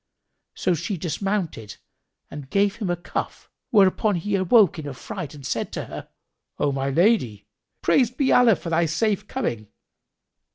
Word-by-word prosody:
So 180 Hz, -, +1 dB
she 170 Hz, +4 st, -3 dB
dismounted 170 Hz, -, -3 dB, 0.5 s
and 145 Hz, -2 st, -8 dB
gave 200 Hz, +2 st, +1 dB
him 205 Hz, -5 st, -3 dB
a 175 Hz, -, +1 dB
cuff,[FN#6] 175 Hz, -, -5 dB, 0.2 s
whereupon 205 Hz, 0 st, +3 dB
he 200 Hz, +4 st, -3 dB
awoke 190 Hz, -2 st, +4 dB
in 150 Hz, -, -6 dB
affright 150 Hz, +4 st, -7 dB
and 140 Hz, -2 st, -11 dB
said -, -, -2 dB
to -, -, -4 dB
her, -, -, -9 dB, 0.5 s
"O -, -, +1 dB
m 135 Hz, 0 st, -2 dB
lady, 165 Hz, -, +2 dB, 0.4 s
praised 245 Hz, +8 st, +2 dB
be 275 Hz, -3 st, +2 dB
Allah 240 Hz, -4 st, +6 dB
for 170 Hz, -, -7 dB
thy 165 Hz, +1 st, +2 dB
safe 205 Hz, +5 st, 0 dB
coming!" 115 Hz, -, -3 dB
180 Hz, 155 wpm, -23 LUFS, 150-210 Hz, 0.5 s, Allah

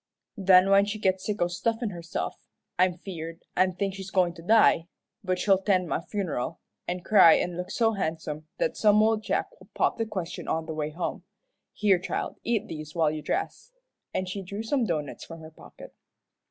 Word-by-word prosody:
"Then 190 Hz, 0 st, +6 dB
when 200 Hz, 0 st, +6 dB
she 205 Hz, +1 st, -3 dB
gets 190 Hz, -2 st, 0 dB
sick 210 Hz, -1 st, -2 dB
from 175 Hz, -3 st, +1 dB
stuffin' 225 Hz, +4 st, -1 dB
herself, 170 Hz, -2 st, -5 dB, 0.4 s
I'm 180 Hz, -1 st, +3 dB
feared, 165 Hz, -3 st, -7 dB
an' 185 Hz, 0 st, +2 dB
think 195 Hz, +1 st, -1 dB
she's 190 Hz, 0 st, -7 dB
goin' 180 Hz, -2 st, +2 dB
to 170 Hz, -, -12 dB
die, 180 Hz, -3 st, +4 dB, 0.4 s
but 185 Hz, -1 st, 0 dB
she'll 195 Hz, 0 st, +3 dB
'tend 185 Hz, -3 st, +2 dB
my -, -, -1 dB
funeral, 170 Hz, -, -3 dB, 0.3 s
an' 180 Hz, +1 st, -3 dB
cry 190 Hz, -4 st, +7 dB
an' 175 Hz, -1 st, -1 dB
look 180 Hz, +1 st, -5 dB
so 225 Hz, -2 st, +2 dB
handsome 160 Hz, -5 st, -4 dB
that -, -, 0 dB
some 210 Hz, 0 st, +4 dB
ole 220 Hz, 0 st, +3 dB
Jack 215 Hz, -, -2 dB
will -, -, -18 dB
pop -, -, +1 dB
the 225 Hz, -, 0 dB
question 185 Hz, -5 st, -5 dB
on 160 Hz, 0 st, -1 dB
the 160 Hz, -, -5 dB
way 155 Hz, -1 st, -2 dB
home. 170 Hz, +3 st, -4 dB, 0.5 s
Here, 200 Hz, -4 st, +3 dB
child, 185 Hz, -, -4 dB
eat 225 Hz, -2 st, 0 dB
these 155 Hz, 0 st, -8 dB
while 160 Hz, -3 st, +3 dB
you 155 Hz, 0 st, -4 dB
dress," 400 Hz, -, -3 dB, 0.4 s
and 185 Hz, -, -2 dB
she 195 Hz, +2 st, -4 dB
drew 200 Hz, +3 st, -6 dB
some 245 Hz, +1 st, +1 dB
doughnuts 150 Hz, -5 st, -3 dB
from 165 Hz, -1 st, -10 dB
her 160 Hz, 0 st, -11 dB
pocket. -, -, -14 dB
185 Hz, 195 wpm, -27 LUFS, 165-210 Hz, 0.5 s, cry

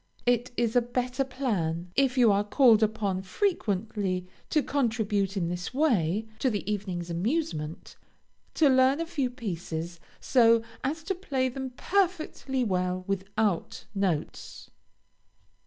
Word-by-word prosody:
It 245 Hz, 0 st, +2 dB
is 235 Hz, -1 st, +1 dB
a 245 Hz, -, +6 dB
better 250 Hz, +2 st, -1 dB
plan, 180 Hz, -11 st, -2 dB
if 270 Hz, -1 st, +2 dB
you 240 Hz, -4 st, +6 dB
are 200 Hz, +1 st, +2 dB
called 225 Hz, 0 st, +5 dB
upon 210 Hz, -3 st, 0 dB
frequently 200 Hz, -, -1 dB, 0.2 s
to 305 Hz, -2 st, +2 dB
contribute 215 Hz, -7 st, 0 dB
in 170 Hz, -3 st, 0 dB
this 180 Hz, +7 st, -4 dB
way 220 Hz, -, +2 dB
to 260 Hz, -, +2 dB
the 205 Hz, -4 st, -3 dB
evening's 185 Hz, -4 st, -3 dB
amusement, 170 Hz, -, -2 dB, 0.6 s
to 310 Hz, -, +5 dB
learn 260 Hz, +2 st, +4 dB
a 330 Hz, -, -1 dB
few 285 Hz, -6 st, -1 dB
pieces 170 Hz, -7 st, -5 dB, 0.2 s
so 230 Hz, -3 st, +4 dB, 0.2 s
as 310 Hz, +5 st, -2 dB
to 385 Hz, -, -1 dB
play 275 Hz, -9 st, -1 dB
them 265 Hz, +1 st, -5 dB
perfectly 335 Hz, -8 st, 0 dB
well 185 Hz, -3 st, -1 dB
without 195 Hz, -1 st, -1 dB
notes. 190 Hz, -7 st, -3 dB
220 Hz, 130 wpm, -28 LUFS, 185-265 Hz, 0.6 s, a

